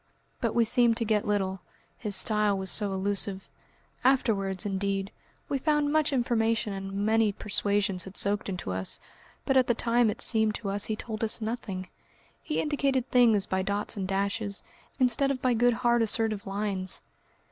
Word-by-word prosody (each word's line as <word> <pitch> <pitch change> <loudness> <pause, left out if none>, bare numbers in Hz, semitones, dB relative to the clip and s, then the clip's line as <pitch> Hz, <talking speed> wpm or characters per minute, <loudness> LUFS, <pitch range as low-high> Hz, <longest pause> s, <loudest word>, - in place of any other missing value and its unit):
But - - -1
we 235 -1 +4
seemed 235 0 +3
to 230 - 0
get 210 -1 0
little, 195 -2 -1 0.4
his 210 -3 -2
style 210 0 +3
was 190 0 -1
so 205 -2 +1
elusive. 195 0 0 0.6
Afterwards, 205 -8 +1
indeed, 195 0 -2 0.4
we 275 - -1
found 295 0 +1
much 310 -1 +2
information 230 -4 0
and 195 0 -6
many 220 -1 +3
persuasions 200 -2 -1
had 190 0 -6
soaked 205 0 +2
into 180 - -4
us, 95 0 -4 0.5
but 270 - +1
at 255 - +4
the 240 - +2
time 235 0 +2
it - - -4
seemed 220 -2 +3
to 210 -4 -4
us 200 +1 0
he 220 - -2
told 220 +1 -6
us 220 - +1
nothing. 215 -5 -4 0.5
He 305 - -2
indicated 275 -4 0
things 230 -5 +4
by 190 0 -1
dots 200 +2 -2
and 195 -2 -3
dashes, 200 +1 -1 0.4
instead 270 +2 +2
of 275 -2 -1
by 250 -1 +1
good 240 +1 +3
hard 240 0 +4
assertive 220 -2 0
lines. 195 -2 -3
215 Hz, 170 wpm, -28 LUFS, 195-240 Hz, 0.6 s, we